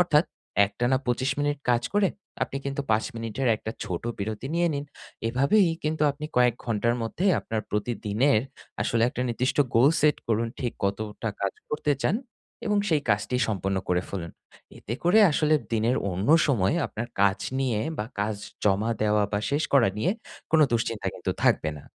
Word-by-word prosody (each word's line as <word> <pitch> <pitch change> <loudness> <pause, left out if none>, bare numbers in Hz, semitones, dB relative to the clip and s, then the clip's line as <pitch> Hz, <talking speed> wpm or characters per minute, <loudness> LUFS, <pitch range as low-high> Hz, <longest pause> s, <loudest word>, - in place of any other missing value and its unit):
অর্থাৎ, 160 -3 +4 0.4
একটানা 120 +5 0
২৫ 130 +2 +1
মিনিট 145 0 0
কাজ 120 -1 +2
করে 205 -2 +4 0.3
আপনি 135 - -2
কিন্তু 140 +1 -2
৫ 110 0 +3
মিনিটের 115 +3 -2
একটা 110 - -6
ছোট 85 -2 -4 0.2
বিরতি 110 +4 -4
নিয়ে 170 0 +2
নিন। 140 - -3 0.4
এভাবেই 140 - +3 0.2
কিন্তু 155 0 0
আপনি 145 +2 -7
কয়েক 125 -2 +5
ঘন্টার 115 0 +1
মধ্যে 115 +11 -3 0.2
আপনার 110 -1 -3
প্রতিদিনের 110 +3 +1 0.4
আসলে 115 -1 +1
একটা 125 - -3
নির্দিষ্ট 125 +2 -1 0.2
গোল 120 +5 +6
set 150 0 +4
করুন 115 +1 +1
ঠিক 120 -3 -1
কতটা 105 +3 -2
কাজ 100 -1 0 0.2
করতে 150 -1 +1
চান - - +2 0.5
এবং 210 -1 +2
সেই 155 -3 +2
কাজটি 105 +5 +1
সম্পন্ন 95 -2 -1
করে 90 0 +2
ফেলুন। 85 -4 -5 0.5
এতে 115 - -5
করে 185 +6 +5
আসলে 155 +1 +2 0.2
দিনের 115 +3 +2
অন্য 95 +6 -2 0.2
সময় 105 -10 +2
আপনার 115 +2 -5 0.2
কাজ 100 0 +3 0.2
নিয়ে 125 -6 0 0.2
বা 105 - -2
কাজ 105 +1 0 0.3
জমা 105 +3 +2
দেওয়া 105 0 +3
বা 100 - +1
শেষ 145 +2 +1
করা 130 -7 +5
নিয়ে 140 - +1 0.4
কোনো 155 -2 +6
দুশ্চিন্তা 115 -2 -1
কিন্তু - - -3
থাকবে 80 - +3
না। - - -14
115 Hz, 170 wpm, -26 LUFS, 105-140 Hz, 0.5 s, গোল